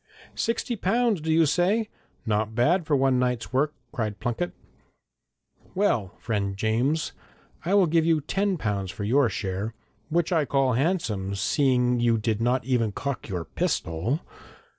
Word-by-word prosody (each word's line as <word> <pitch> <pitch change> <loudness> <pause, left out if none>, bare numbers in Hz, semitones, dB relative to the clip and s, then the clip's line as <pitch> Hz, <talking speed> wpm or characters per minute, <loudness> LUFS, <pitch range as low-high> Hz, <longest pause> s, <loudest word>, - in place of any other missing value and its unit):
'Sixty 235 +1 -1
pounds, 220 -1 +1
do 160 +1 -1
you 160 0 +5
say? 185 +9 +2 0.4
Not 110 0 0
bad 160 +8 +2
for 150 - +3
one 135 -2 +3
night's 125 -1 -1
work,' 145 +3 +1 0.2
cried 110 -4 -3
Plunket. 120 +9 -2 1.2
'Well, 120 - +1
friend 100 -4 -2
James, 120 +9 0 0.5
I 190 +4 +2
will 200 -2 +6
give 165 0 +2
you 165 -1 +3
ten 195 +6 -1
pounds 100 - -2
for 100 - -6
your 125 +4 +3
share, 100 +3 -3 0.3
which 170 +1 +1
I 160 -3 +3
call 135 -2 +2
handsome, 115 - 0
seeing 125 +2 +2
you 120 -1 +3
did 110 0 -1
not 125 +1 +1
even 120 -4 +1
cock 140 +2 -4
your 90 -4 -3
pistol! 90 - -1
130 Hz, 150 wpm, -26 LUFS, 110-165 Hz, 1.2 s, will